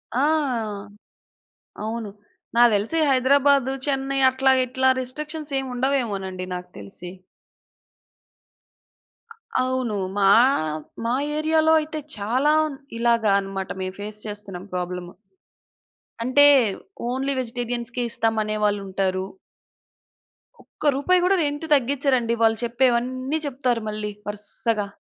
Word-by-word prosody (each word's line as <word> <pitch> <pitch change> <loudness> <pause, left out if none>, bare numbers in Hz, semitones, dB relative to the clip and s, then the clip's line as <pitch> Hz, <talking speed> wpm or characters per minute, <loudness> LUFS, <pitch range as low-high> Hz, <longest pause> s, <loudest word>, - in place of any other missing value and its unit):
ఆ! - - +2 1.6
అవును. 220 0 -4 0.5
నాకు 240 0 +6
తెలిసి 210 +11 -1
హైదరాబాదు, 270 0 +3
చెన్నై 270 -1 -1
అట్లా 265 +1 +2
ఇట్లా 260 +1 0
రిస్ట్రిక్షన్స్ 300 +3 -5
ఏమి 265 -1 -5
ఉండవేమోనండి 210 -9 -1
నాకు 180 0 -7
తెలిసి. 105 - -9 2.5
అవును. 255 -3 -1 0.2
మా 200 -1 +4 0.8
మా 235 +2 +1 0.2
ఏరియా‌లో 315 +1 +3
అయితే 310 0 -5 0.2
చాలా 245 +8 +1
ఉ - - -5 0.3
ఇలాగ 235 -1 +2 0.2
అనమాట. 195 -1 -5
మేము 185 0 -4
ఫేస్ 210 +1 -7
చేస్తున్నాం 200 -3 -7
ప్రాబ్లము. 180 0 -4 1.1
అంటే 275 +4 +5 0.6
ఓన్లీ 265 +2 -1
వెజిటేరియన్స్‌కి 245 0 -3
ఇస్తాం 225 -1 -1
అనే 215 0 -3
వాళ్ళు 205 -1 +2
ఉంటారు. 190 0 -1 1.4
ఒక్క 300 - -2
రూపాయి 360 +6 +2
కూడా 390 +2 +4
రెంట్ 290 +2 -3
తగ్గించరండి. 260 -3 +2
వాళ్ళు 225 0 +4
చెప్పేవన్నీ 255 +4 0
చెప్తారు 250 -4 -1
మళ్ళీ 210 0 -4 0.2
వరుసగా. 210 +1 -3
245 Hz, 105 wpm, -23 LUFS, 210-270 Hz, 2.5 s, నాకు